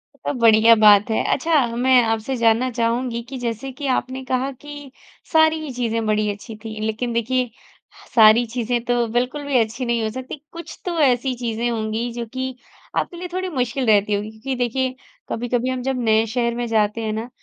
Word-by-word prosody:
तो - - -4
बढ़िया 230 -2 +6
बात 210 0 +6
है। 220 - +1
अच्छा, 300 -2 +2
मैं 255 +1 +4
आपसे 225 +3 -1
जानना 230 +2 +3
चाहूँगी 235 +1 -1
कि 265 - -6
जैसे 245 +2 -4
कि 280 +1 -6
आपने 260 +1 -4
कहा 255 +1 -1
कि 290 +1 -11 0.4
सारी 315 -1 +3
चीज़ें 230 -2 -1
बड़ी 215 0 +1
अच्छी 215 +2 -9
थी। 220 -1 -7
लेकिन 230 +2 -2
देखिये 245 +2 0 0.7
सारी 225 +1 +7
चीज़े 245 0 0
तो 240 -1 +2
बिल्कुल 250 +6 -1
भी 280 -2 +1
अच्छी 230 +3 -1
नहीं 235 -1 0
हो 220 - -1
सकती। 260 +4 -7
कुछ 335 0 -9
तो 350 -2 -2
ऐसी 260 -2 +2
चीज़े 235 -1 -2
होंगी 225 +1 -2
जो 235 0 -4
कि 260 0 -3 0.4
आपके 345 - -2
लिए 360 +1 -5
थोड़ी 370 0 -2
मुश्किल 255 -2 -1
रहती 210 -1 +3
होगी। 205 +1 -2
क्योंकि 255 +5 -5
देखिये 255 +1 -1 0.3
कभी-कभी 245 +1 -1
हम 255 -1 -2
जब 265 0 -2
नए 220 0 +3
शहर 235 +1 -1
में 240 0 -2
जाते 220 0 +1
हैं 215 -1 -2
ना, 225 +3 -4
240 Hz, 190 wpm, -21 LUFS, 225-260 Hz, 0.7 s, सारी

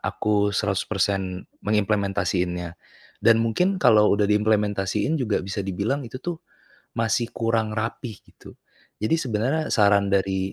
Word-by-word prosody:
aku 105 -1 0
100% 95 -2 -1 0.2
mengimplementasiinnya. 95 -4 0 0.5
Dan 115 -1 +4
mungkin 180 - 0
kalau 110 -4 +5
udah 100 0 +2
diimplementasiin 105 +4 +1
juga 110 -5 0
bisa 95 +1 -4
dibilang 105 +9 -2
itu 125 +3 -8
tuh, 175 -1 -3 0.6
masih 115 +1 0
kurang 115 -2 0
rapi 110 0 -4
gitu. - - -16 0.5
Jadi 110 - +2
sebenarnya, 130 +5 -1
saran 100 -3 +4
dari 95 0 0
105 Hz, 120 wpm, -24 LUFS, 100-115 Hz, 0.6 s, kalau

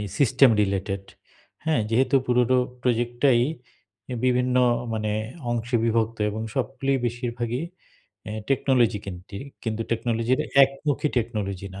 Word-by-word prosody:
এই - - -3
system 135 -1 +5
related. 95 0 -2 0.6
হ্যাঁ, 160 -6 +2
যেহেতু 130 +3 +3
পুরো 125 +1 +3 0.2
প্রজেক্ট 120 -1 0
টাই 120 -4 +6 0.7
অ্যা 125 - -4
বিভিন্ন 125 0 +2 0.4
মানে 110 -1 -1 0.4
অংশে 120 +1 0
বিভক্ত 115 0 +1
এবং 110 +2 -4
সবগুলোই 135 +1 0
বেশিরভাগই 120 +2 -3 0.6
অ্যা 105 - -6 0.2
টেকনোলজি 130 -5 +2
কেন্দ্রিক 95 +1 -8 0.2
কিন্তু 115 -1 -2
টেকনোলজির 115 +2 0 0.2
একমুখী 140 +2 -2
টেকনোলজি 100 -5 -3
না 95 - -8
120 Hz, 120 wpm, -25 LUFS, 110-130 Hz, 0.7 s, টাই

